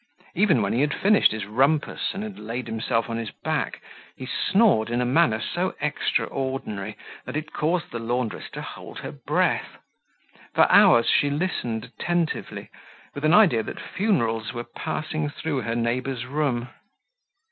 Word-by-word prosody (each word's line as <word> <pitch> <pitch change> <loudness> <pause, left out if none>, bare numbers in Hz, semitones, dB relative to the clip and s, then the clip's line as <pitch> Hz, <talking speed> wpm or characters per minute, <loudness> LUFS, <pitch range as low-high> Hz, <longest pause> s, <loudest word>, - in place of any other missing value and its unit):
Even 175 - +3
when 100 - 0
he 120 - +2
had 145 0 +1
finished 205 +1 +4
his 110 -2 -4
rumpus 135 - +1
and 200 - -3
had 215 -3 -7
laid 115 +4 -4
himself 115 +1 -1
on 115 -1 -3
his 115 -2 -4
back, - - -3 0.3
he 130 - -7
snored 190 - +3
in 120 +1 0
a 125 - +1
manner 125 -3 +3
so 180 +9 -2
extraordinary 130 -7 -2 0.3
that 130 - -6
it 155 0 -6
caused 170 +3 -1
the 115 - -4
laundress 120 0 -2
to - - -7
hold - - -9
her - - -6
breath. - - -1 0.8
For - - +7
hours 115 0 +7
she 145 - +3
listened 140 -8 -2
attentively, 175 -2 -3 0.4
with 145 - -7
an 155 +3 +5
idea 175 - +6
that - - -7
funerals 115 - 0
were 120 - -4
passing 155 +4 -3
through 145 -2 -3
her 115 +1 -2
neighbor's 120 +2 -1
room. 130 -3 -1
130 Hz, 160 wpm, -25 LUFS, 115-160 Hz, 0.8 s, For